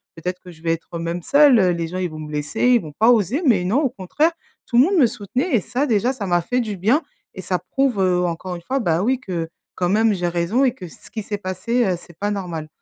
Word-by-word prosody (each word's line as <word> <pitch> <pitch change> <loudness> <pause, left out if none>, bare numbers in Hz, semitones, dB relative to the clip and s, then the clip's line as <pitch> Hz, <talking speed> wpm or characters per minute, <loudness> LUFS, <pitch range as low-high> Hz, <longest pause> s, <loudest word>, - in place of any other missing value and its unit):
«Peut-être 180 +2 -4
que 180 - -12
je 160 -2 -17
vais 165 -1 +1
être, 165 - -7
heu, - - -3
même 170 +1 -3
seule, 285 -2 +6 0.2
les 165 -1 -3
gens 180 +2 -6
ils 180 -2 -1
vont 155 0 -9
me 150 0 -7
laisser, 150 +11 -1
ils 245 -3 +5
vont 155 - -9
pas 225 +2 +5
oser». 235 - +3
Mais 200 -7 +4
non, 210 +10 +1
au 275 - +1
contraire, 285 - 0 0.3
tout 235 - 0
le 250 - +8
monde 385 +5 +1
me 260 -6 +6
soutenait 245 - -2
et 210 - +3
ça, 250 +8 -1
déjà, 235 +2 +2
ça 230 -6 -5
m'a 175 -1 +2
fait 245 +9 -1
du 215 -4 -2
bien 225 - +2 0.3
et 190 - -7
ça 180 0 -1
prouve, 245 +4 -1
heu, 180 -1 +2
encore 180 +1 -4
une - - -11
fois, 265 +9 -2
bah, 170 -6 +1
oui 255 +5 +1
que, 170 -6 -4 0.3
quand 180 - 0
même, 220 +2 +3
j'ai 175 -2 -1
raison 175 +10 +1
et 250 - +2
que 185 -7 -9
ce - - -17
qui 220 -2 -5
s'est 205 0 -4
passé, 205 +6 -1
heu, 185 -2 +1
c'est 170 -1 -17
pas 205 +1 -1
normal. 175 -6 -4
195 Hz, 275 wpm, -21 LUFS, 175-245 Hz, 0.3 s, le